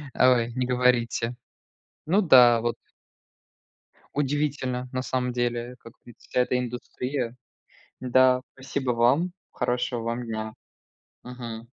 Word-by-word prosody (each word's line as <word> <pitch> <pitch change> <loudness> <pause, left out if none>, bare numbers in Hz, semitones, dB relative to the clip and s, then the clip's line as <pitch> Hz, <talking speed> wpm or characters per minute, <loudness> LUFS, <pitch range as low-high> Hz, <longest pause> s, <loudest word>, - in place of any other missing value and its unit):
Ой, 120 -2 +4
не 130 -1 0
говорите. 125 -1 +1 0.7
Ну 190 +7 +3
да, 125 - +7
вот. 120 0 -1 1.4
Удивительно, 140 -3 -1
на 130 - -2
самом 125 -1 -1
деле, 120 0 -2
как 115 - -14
видите, 120 +1 -10
это 125 0 +2
индустрия. 125 0 -4 0.7
Да, 130 0 +4
спасибо 135 -1 -2
вам. 130 +10 +2 0.2
Хорошего 125 -1 -1
вам 115 +1 -3
дня. 110 -1 -4 0.7
Мгм. 120 -2 -8
125 Hz, 105 wpm, -26 LUFS, 120-130 Hz, 1.4 s, да